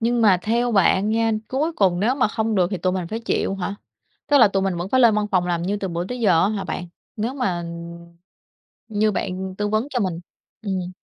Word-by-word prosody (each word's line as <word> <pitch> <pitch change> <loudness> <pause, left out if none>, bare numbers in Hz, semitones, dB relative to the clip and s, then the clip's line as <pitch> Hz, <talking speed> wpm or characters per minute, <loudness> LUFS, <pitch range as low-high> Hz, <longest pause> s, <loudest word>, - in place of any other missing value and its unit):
nhưng 235 +1 +1
mà 195 -4 +5
theo 235 +2 +1
bạn 195 +1 +3
nha, 225 +1 +2 0.2
cuối 300 +6 -1
cùng 185 - +2
nếu 235 +6 +2
mà 255 -5 +2
không 220 0 -1
được 185 -3 +3
thì 195 - -1
tụi 185 +2 0
mình 185 -2 -2
phải 225 +1 -4
chịu 210 - -1
hả? 195 +1 -3 0.5
Tức 290 - +4
là 235 -5 +7
tụi 195 -1 0
mình 190 -2 -1
vẫn 175 +2 -4
phải 260 +5 +3
lên 230 -3 +6
văn 210 0 0
phòng 180 -2 +2
làm 170 -1 -1
như 200 +3 -1
từ 200 -2 -4
bữa 170 0 -3
tới 245 +4 -5
giờ 180 -7 +4
á 195 - +2
hả 205 -3 -3
bạn? 180 0 -4 0.3
Nếu 230 +5 -2
mà, 195 -10 -1
ừm, 170 0 -9 0.7
như 215 -1 +1
bạn 185 0 -3
tư 210 - 0
vấn 215 +5 0
cho 250 - -1
mình 180 -4 -2 0.4
ừm. 185 -3 -3
200 Hz, 245 wpm, -22 LUFS, 180-225 Hz, 0.7 s, là